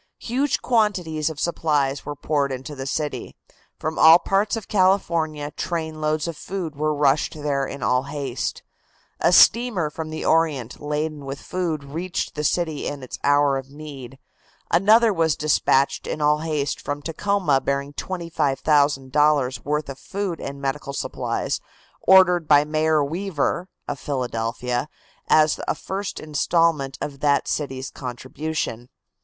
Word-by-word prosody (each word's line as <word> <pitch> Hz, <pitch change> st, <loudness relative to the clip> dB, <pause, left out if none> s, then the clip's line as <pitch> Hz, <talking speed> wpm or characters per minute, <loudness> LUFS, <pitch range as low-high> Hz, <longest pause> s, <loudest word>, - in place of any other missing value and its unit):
Huge 265 Hz, +4 st, -1 dB
quantities 180 Hz, -10 st, +1 dB
of 155 Hz, -2 st, -7 dB
supplies 145 Hz, -5 st, 0 dB
were 145 Hz, -, -4 dB
poured 145 Hz, -1 st, 0 dB
into 130 Hz, +3 st, -6 dB
the 135 Hz, -1 st, -6 dB
city. 150 Hz, +1 st, -3 dB, 0.4 s
From 155 Hz, 0 st, -3 dB
all 160 Hz, +1 st, +9 dB
parts 195 Hz, +5 st, +1 dB
of 225 Hz, -3 st, -6 dB
California 170 Hz, -6 st, +1 dB
trainloads 155 Hz, -1 st, -2 dB
of 170 Hz, -, -4 dB
food 175 Hz, -3 st, -5 dB
were 155 Hz, +2 st, 0 dB
rushed 145 Hz, +1 st, +2 dB
there 145 Hz, -3 st, -1 dB
in 140 Hz, -, -7 dB
all 125 Hz, +1 st, +2 dB
haste. 140 Hz, -3 st, -4 dB, 0.6 s
A -, -, +3 dB
steamer 225 Hz, -10 st, +5 dB
from 160 Hz, +1 st, -6 dB
the 155 Hz, 0 st, -5 dB
Orient 150 Hz, -7 st, +1 dB
laden 150 Hz, 0 st, -3 dB
with 135 Hz, 0 st, -6 dB
food 170 Hz, -5 st, -3 dB
reached 165 Hz, +6 st, -4 dB
the 150 Hz, -, -4 dB
city 160 Hz, -2 st, 0 dB
in 145 Hz, -2 st, -5 dB
its 130 Hz, -, -8 dB
hour 145 Hz, -1 st, +3 dB
of 135 Hz, 0 st, -11 dB
need; 140 Hz, -3 st, -10 dB, 0.5 s
another 215 Hz, +5 st, +5 dB
was 165 Hz, -4 st, +2 dB
dispatched 140 Hz, -2 st, +2 dB
in -, -, -3 dB
all 150 Hz, 0 st, +3 dB
haste 150 Hz, -3 st, -2 dB
from 145 Hz, 0 st, -4 dB
Tacoma 165 Hz, -3 st, +1 dB
bearing 140 Hz, +1 st, -2 dB
$25,000 145 Hz, -5 st, +1 dB
worth 150 Hz, +1 st, -1 dB
of 135 Hz, -1 st, -8 dB
food 195 Hz, -4 st, -4 dB
and 140 Hz, 0 st, -6 dB
medical 140 Hz, +1 st, -3 dB
supplies, -, -, -2 dB, 0.4 s
ordered 180 Hz, -3 st, +5 dB
by 145 Hz, -1 st, +6 dB
Mayor 155 Hz, 0 st, +2 dB
Weaver, 175 Hz, +2 st, -2 dB, 0.2 s
of 145 Hz, -2 st, -4 dB
Philadelphia, 125 Hz, 0 st, -2 dB, 0.4 s
as 155 Hz, -1 st, +4 dB
a -, -, +1 dB
first 195 Hz, +1 st, -5 dB
installment 155 Hz, -2 st, +1 dB
of 140 Hz, -2 st, -5 dB
that 145 Hz, 0 st, +2 dB
city's 135 Hz, -2 st, -3 dB
contribution. 130 Hz, -1 st, -5 dB
150 Hz, 140 wpm, -23 LUFS, 140-165 Hz, 0.6 s, all